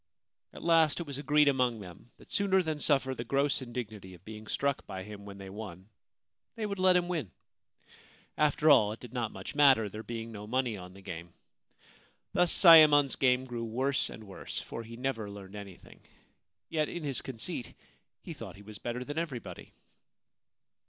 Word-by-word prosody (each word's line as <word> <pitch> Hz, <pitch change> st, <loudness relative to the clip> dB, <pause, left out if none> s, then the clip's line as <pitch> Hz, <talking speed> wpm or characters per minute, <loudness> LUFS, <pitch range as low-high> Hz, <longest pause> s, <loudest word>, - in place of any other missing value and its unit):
At -, -, -11 dB
last 165 Hz, -2 st, +4 dB
it 170 Hz, -, -4 dB
was 140 Hz, -2 st, -6 dB
agreed 150 Hz, +1 st, +4 dB
among 125 Hz, -4 st, +2 dB
them 95 Hz, +4 st, -12 dB
that -, -, -18 dB
sooner 190 Hz, -2 st, +3 dB
than 155 Hz, -2 st, -2 dB
suffer 135 Hz, -3 st, +2 dB
the 120 Hz, -, -5 dB
gross 140 Hz, +3 st, +1 dB
indignity 110 Hz, -7 st, -7 dB
of 90 Hz, +2 st, -20 dB
being 110 Hz, 0 st, -9 dB
struck 140 Hz, +2 st, -1 dB
by 95 Hz, -2 st, -6 dB
him 100 Hz, 0 st, -10 dB
when 100 Hz, -1 st, -9 dB
they 100 Hz, -1 st, -9 dB
won 95 Hz, -2 st, -9 dB, 0.7 s
they 220 Hz, -, -3 dB
would 200 Hz, -2 st, -4 dB
let 185 Hz, -1 st, +5 dB
him 175 Hz, -1 st, 0 dB
win. 160 Hz, -, -2 dB, 1.1 s
After 150 Hz, +1 st, +4 dB
all, 105 Hz, -7 st, +5 dB
it 110 Hz, -, -11 dB
did 125 Hz, -1 st, -11 dB
not 120 Hz, -3 st, -2 dB
much -, -, -8 dB
matter, 135 Hz, -7 st, +5 dB
there 105 Hz, +3 st, -7 dB
being 115 Hz, 0 st, -6 dB
no 105 Hz, -1 st, -8 dB
money 125 Hz, -1 st, 0 dB
on 90 Hz, -1 st, -10 dB
the 100 Hz, -, -14 dB
game. 85 Hz, -2 st, -8 dB, 1.0 s
Thus 180 Hz, -1 st, +3 dB
Sayemon's 155 Hz, -5 st, +8 dB
game 130 Hz, -1 st, +2 dB
grew 120 Hz, -2 st, -5 dB
worse 130 Hz, +5 st, 0 dB
and 110 Hz, -, -10 dB
worse, 100 Hz, -2 st, -6 dB
for -, -, -7 dB
he 115 Hz, +1 st, -10 dB
never 120 Hz, -5 st, -2 dB
learned 100 Hz, -1 st, -10 dB
anything; 100 Hz, -3 st, -11 dB, 0.7 s
yet 155 Hz, -2 st, 0 dB
in 175 Hz, -, -5 dB
his 140 Hz, -4 st, -1 dB
conceit 125 Hz, 0 st, -6 dB, 0.5 s
he -, -, -6 dB
thought -, -, -9 dB
he 100 Hz, -, -14 dB
was 105 Hz, 0 st, -10 dB
better 120 Hz, +1 st, -4 dB
than 145 Hz, +4 st, -3 dB
everybody. 140 Hz, -9 st, -6 dB
125 Hz, 185 wpm, -31 LUFS, 105-145 Hz, 1.1 s, Sayemon's